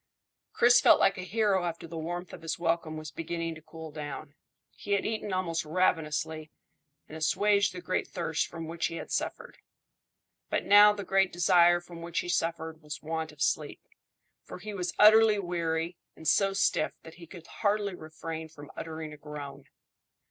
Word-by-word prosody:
Chris 240 +1 +5
felt - - +6
like 195 -1 +3
a - - -3
hero 195 -1 +1
after 170 -1 -4
the 165 - -9
warmth 175 +2 -5
of 170 - -9
his 165 +2 -3
welcome 165 -2 -1
was 155 -1 -7
beginning 165 +1 -4
to 160 - -12
cool 160 0 -10
down. 145 -1 -7 0.4
He 205 - -4
had 200 - +1
eaten 215 -2 -3
almost 180 -3 -1
ravenously, 155 -2 0 0.6
and 155 - -10
assuaged 200 +5 +2
the 180 - -8
great 185 +1 -1
thirst 170 -4 -2
from 165 -1 -7
which 165 +1 -2
he 165 - -7
had - - -7
suffered. - - -3 0.9
But - - -1
now 205 +1 +8
the 205 -1 -5
great 195 -1 +2
desire 175 0 +5
from 175 -1 -11
which 170 0 -2
he 175 - -7
suffered 165 -2 -2
was 150 0 -8
want 160 0 -3
of 150 -1 -3
sleep, - - -1 0.6
for - - -9
he 210 +3 -7
was 180 -3 -2
utterly 215 0 +7
weary 170 -2 -2 0.2
and 160 - -8
so 195 -1 +3
stiff 195 -5 +1
that 160 - -11
he 170 -1 -12
could 170 0 -12
hardly 205 -1 -1
refrain 160 -1 -7
from 145 -2 -12
uttering 160 -1 -6
a - - -11
groan. 150 -2 -8
170 Hz, 180 wpm, -29 LUFS, 160-190 Hz, 0.9 s, now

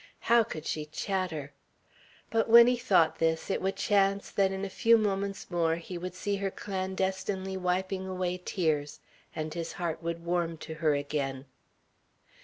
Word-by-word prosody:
How 235 0 +5
could 160 -6 -7
she 150 -1 -3
chatter! 160 -3 -3 0.8
But 225 0 +1
when 235 +1 +10
he 250 +1 +3
thought 195 -10 +3
this, 160 +2 0
it - - -1
would 190 +1 -1
chance 200 -1 +1
that 195 -1 +2
in 195 +1 -3
a - - -3
few 230 +4 +4
moments 200 -2 -2
more 165 -2 +2
he 170 +2 -7
would 180 +1 -5
see 200 +2 -2
her 195 0 -1
clandestinely 190 0 -3
wiping 185 +1 -1
away 180 -1 -2
tears, 155 -7 -1 0.4
and 155 0 -3
his 170 -1 -4
heart 170 -3 -3
would 170 0 -4
warm 170 -1 0
to 160 - -7
her 155 -2 +1
again. 140 -2 -3
185 Hz, 165 wpm, -29 LUFS, 165-195 Hz, 0.8 s, when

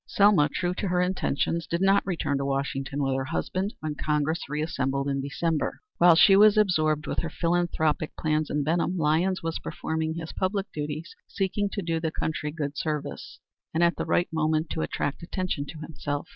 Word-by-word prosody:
Selma, 200 -7 +4
true 175 0 -1
to 200 - -3
her 180 0 +1
intentions, 175 -2 0
did 170 - -1
not 195 +1 +4
return 160 -6 -1
to - - -1
Washington 135 0 -2
with 135 -1 +1
her 135 0 -1
husband 190 +8 -2
when 155 -1 -2
Congress 150 +1 -1
reassembled 140 -2 -1
in 140 -1 0
December. 150 +3 -1 0.2
While 175 -1 +7
she 195 +4 +7
was 210 +1 +7
absorbed 155 -7 +2
with - - -2
her 165 - -2
philanthropic 165 -2 0
plans 155 -1 0
in 150 -1 0
Benham, 170 +4 0
Lyons 165 +4 +1
was 165 0 -2
performing 160 0 -3
his 165 -1 -6
public 195 +1 -1
duties; 150 +3 -5
seeking 200 +1 -1
to 200 - -2
do 165 -1 -1
the 160 0 -1
country 155 -1 -3
good 150 -2 -4
service, 150 -3 -4 0.4
and 170 - +3
at 170 0 +3
the - - -3
right 175 - +2
moment 155 0 0
to 160 - -2
attract 145 -2 -2
attention 170 -4 -3
to 160 - -8
himself. 145 -2 -4
160 Hz, 185 wpm, -27 LUFS, 150-175 Hz, 0.4 s, While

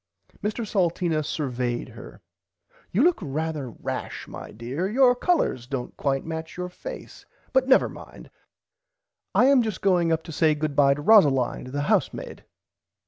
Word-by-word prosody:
Mr 215 +2 -2
Salteena 170 -5 0
survayed 125 -5 -3
her. - - -12 0.7
You 215 +9 +3
look 350 +1 +4
rarther 150 - -4
rash - - -5
my - - -9
dear 130 - -4
your 250 +2 +5
colors 245 - 0
dont 130 -2 -5
quite 135 -1 -1
match 160 0 -6
your 180 0 -4
face - - -10 0.3
but 260 0 +3
never 265 - +5
mind - - -12 1.0
I 245 - +5
am 275 -1 +5
just 220 -3 -3
going 175 -4 +3
up 160 0 0
to - - -9
say 155 0 +2
goodbye 145 -2 +2
to 145 - -7
Rosalind 145 - +4
the 140 +3 -3
housemaid. 145 - -1
160 Hz, 145 wpm, -25 LUFS, 140-210 Hz, 1.0 s, your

